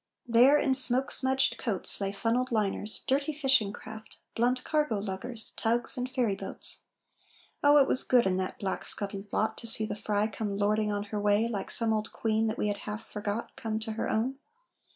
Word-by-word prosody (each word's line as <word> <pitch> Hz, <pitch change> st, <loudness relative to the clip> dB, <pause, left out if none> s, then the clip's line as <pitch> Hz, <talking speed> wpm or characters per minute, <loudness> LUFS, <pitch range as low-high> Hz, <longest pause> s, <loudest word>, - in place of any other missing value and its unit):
There, 245 Hz, +5 st, +5 dB
in 270 Hz, -2 st, +1 dB
smoke 260 Hz, 0 st, +5 dB
smudged 265 Hz, -3 st, +2 dB
coats, 210 Hz, -3 st, -3 dB
Lay 195 Hz, 0 st, -1 dB
funnelled 230 Hz, +6 st, -1 dB
liners, 210 Hz, -1 st, -1 dB
dirty 280 Hz, +3 st, 0 dB
fishing 270 Hz, -8 st, +2 dB
craft, 220 Hz, +1 st, -12 dB, 0.2 s
Blunt 250 Hz, +2 st, 0 dB
cargo 300 Hz, -8 st, 0 dB
luggers, 210 Hz, +4 st, -5 dB
tugs, 235 Hz, +4 st, +1 dB
and 250 Hz, 0 st, -4 dB
ferry 245 Hz, -6 st, -1 dB
boats. -, -, -2 dB, 0.8 s
Oh, 290 Hz, +1 st, +6 dB
it 275 Hz, -, +5 dB
was -, -, +7 dB
good 250 Hz, -2 st, +3 dB
in 185 Hz, -1 st, 0 dB
that 185 Hz, 0 st, -4 dB
black 190 Hz, -2 st, -4 dB
scuttled 200 Hz, 0 st, -2 dB
lot 220 Hz, 0 st, -1 dB
To 230 Hz, -, -4 dB
see 220 Hz, -1 st, +5 dB
the -, -, -5 dB
Frye 210 Hz, 0 st, -1 dB
come 210 Hz, -2 st, -4 dB
lording 210 Hz, +1 st, 0 dB
on 205 Hz, 0 st, -2 dB
her 210 Hz, -, -2 dB
way 205 Hz, +2 st, +2 dB
Like 210 Hz, -4 st, -5 dB
some 225 Hz, -1 st, +2 dB
old 215 Hz, 0 st, -3 dB
queen 220 Hz, 0 st, -1 dB
that 220 Hz, -, -3 dB
we -, -, -1 dB
had 205 Hz, -1 st, -2 dB
half 210 Hz, +2 st, -7 dB
forgot 210 Hz, +2 st, -5 dB
Come 220 Hz, -1 st, -4 dB
to 220 Hz, -, -5 dB
her 220 Hz, -, -3 dB
own. 255 Hz, +5 st, -2 dB
220 Hz, 195 wpm, -28 LUFS, 205-250 Hz, 0.8 s, was